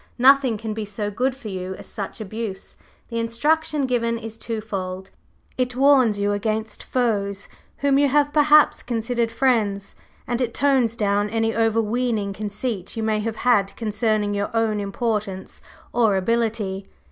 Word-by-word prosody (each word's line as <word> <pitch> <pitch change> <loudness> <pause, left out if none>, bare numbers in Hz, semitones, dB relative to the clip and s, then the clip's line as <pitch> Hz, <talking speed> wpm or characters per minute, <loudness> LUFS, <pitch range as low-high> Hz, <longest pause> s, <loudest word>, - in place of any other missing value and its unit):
Nothing 260 -2 +5
can 220 0 -4
be 220 0 -4
so 205 0 -4
good 255 +5 0
for 265 -5 -8
you 185 -1 -5
as - - -11
such 200 0 -6
abuse; 215 -2 -6 0.3
the 230 -1 -2
instruction 295 +6 +1
given 235 -2 0
is 225 -1 -7
twofold; 195 -5 -5 0.5
it 250 -1 0
warns 260 -5 +4
you 205 0 0
against 215 +1 -2
foes 200 -5 -1 0.4
whom 275 -1 +4
you 285 - +4
have 290 +1 +2
perhaps 300 0 +5
considered 235 0 -1
friends, 215 -7 0 0.3
and 245 +1 -2
it 235 -2 -1
tones 260 -5 +2
down 205 -1 +1
any 225 +1 0
overweening 225 -1 0
conceit 205 0 -4
you 225 - -1
may 215 -1 +1
have 220 +1 -3
had 200 -5 +3
concerning 215 -1 0
your 200 0 -1
own 220 -2 +1
importance 200 -2 -3 0.3
or 225 -5 +3
ability. 210 -2 -1
225 Hz, 150 wpm, -23 LUFS, 205-245 Hz, 0.5 s, Nothing